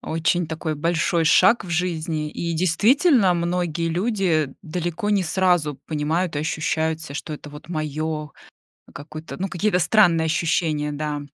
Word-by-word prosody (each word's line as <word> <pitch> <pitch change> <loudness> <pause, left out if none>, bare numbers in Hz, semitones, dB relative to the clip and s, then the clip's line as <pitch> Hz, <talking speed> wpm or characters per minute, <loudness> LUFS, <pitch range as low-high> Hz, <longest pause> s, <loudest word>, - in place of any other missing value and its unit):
Очень 165 +1 0
такой 160 -1 -4
большой 165 +1 +1
шаг 190 +8 +5
в 175 - -8
жизни, 160 -3 -2
и, 170 +2 -3
действительно, 205 - +3
многие 170 -1 -1
люди 175 - 0
далеко 175 +3 -3
не 200 -3 +2
сразу 175 -3 +1
понимают 160 +2 -1
и - - 0
ощущают 160 +1 -1
себя, 145 -3 -7
что 155 - -6
это 150 0 -8
вот 150 +2 -12
моё 155 -1 -3 0.7
какое-то, 155 +2 -8
ну, 195 - -2
какие-то 195 +1 +1
странные 175 -4 +4
ощущения, 160 -2 0
да. 150 0 -3
165 Hz, 145 wpm, -22 LUFS, 155-180 Hz, 0.7 s, шаг